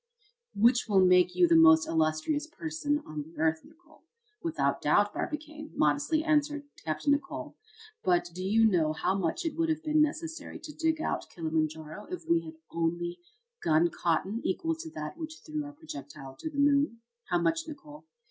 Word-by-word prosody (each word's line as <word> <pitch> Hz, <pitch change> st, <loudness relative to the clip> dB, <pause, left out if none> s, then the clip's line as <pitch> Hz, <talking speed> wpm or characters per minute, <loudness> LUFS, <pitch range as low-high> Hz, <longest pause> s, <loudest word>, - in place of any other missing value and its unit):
"Which 235 Hz, +4 st, +4 dB
will 190 Hz, -2 st, +5 dB
make 180 Hz, 0 st, +5 dB
you 180 Hz, -1 st, +5 dB
the 170 Hz, -, +4 dB
most 160 Hz, 0 st, +7 dB
illustrious 160 Hz, -, 0 dB
person 310 Hz, -2 st, -2 dB
on 155 Hz, -1 st, -5 dB
the 160 Hz, +3 st, -13 dB
earth, 160 Hz, 0 st, +1 dB
Nicholl." 335 Hz, 0 st, -21 dB, 0.4 s
"Without 310 Hz, -, 0 dB
doubt, 205 Hz, +8 st, +3 dB
Barbicane," 305 Hz, 0 st, -5 dB
modestly 310 Hz, +2 st, +2 dB
answered 295 Hz, -2 st, +1 dB, 0.2 s
Capt. 155 Hz, -, -4 dB
Nicholl. 285 Hz, 0 st, 0 dB, 0.5 s
"But 175 Hz, -1 st, +2 dB
do 185 Hz, +2 st, -5 dB
you 220 Hz, +4 st, +4 dB
know 165 Hz, -7 st, +3 dB
how 160 Hz, -, 0 dB
much 190 Hz, -, -1 dB
it 325 Hz, -, -2 dB
would 330 Hz, 0 st, 0 dB
have 315 Hz, 0 st, -1 dB
been 305 Hz, -1 st, +3 dB
necessary 315 Hz, +2 st, -2 dB
to 300 Hz, -, -10 dB
dig 320 Hz, 0 st, 0 dB
out -, -, -2 dB
Kilimanjaro 160 Hz, +2 st, -3 dB
if 360 Hz, -3 st, -7 dB
we 335 Hz, -1 st, +1 dB, 0.2 s
only 170 Hz, +1 st, -2 dB
had 460 Hz, +6 st, -25 dB
gun 160 Hz, +2 st, +4 dB
cotton 185 Hz, +8 st, -1 dB
equal 325 Hz, -, 0 dB
to 325 Hz, 0 st, -7 dB
that 340 Hz, -, -7 dB
which 315 Hz, 0 st, -7 dB
threw 305 Hz, -1 st, -3 dB
our 290 Hz, -, -8 dB
projectile 140 Hz, -, -9 dB
to 315 Hz, -, -4 dB
the 295 Hz, -, -9 dB
moon?" 285 Hz, -4 st, +3 dB, 0.3 s
"How 175 Hz, -, +3 dB
much, 165 Hz, -, 0 dB
Nicholl?" 300 Hz, 0 st, -11 dB
245 Hz, 175 wpm, -29 LUFS, -, 0.5 s, most